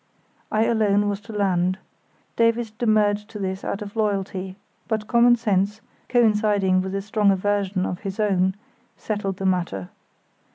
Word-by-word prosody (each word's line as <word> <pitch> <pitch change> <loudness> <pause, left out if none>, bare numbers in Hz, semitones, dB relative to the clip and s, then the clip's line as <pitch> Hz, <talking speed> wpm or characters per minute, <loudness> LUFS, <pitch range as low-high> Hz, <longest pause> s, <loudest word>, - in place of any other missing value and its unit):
I 215 +1 +2
alone 205 -3 +2
was 200 -1 -2
to 225 - -11
land. 185 -3 +1 0.6
Davies 230 -1 +2
demurred 215 -2 +2
to 225 - -9
this 190 -1 -4
out 200 - -3
of 205 +1 -10
loyalty, 195 -3 -2 0.3
but 220 -2 -1
common 240 0 +5
sense, 210 -2 0 0.3
coinciding 210 -5 +3
with 190 +1 -4
a 195 - -2
strong 210 0 +2
aversion 195 -1 0
of 180 - -4
his 195 +1 -6
own, 190 -3 +2 0.4
settled 200 -3 -3
the 195 - -4
matter. 175 - -1
205 Hz, 150 wpm, -23 LUFS, 190-215 Hz, 0.6 s, common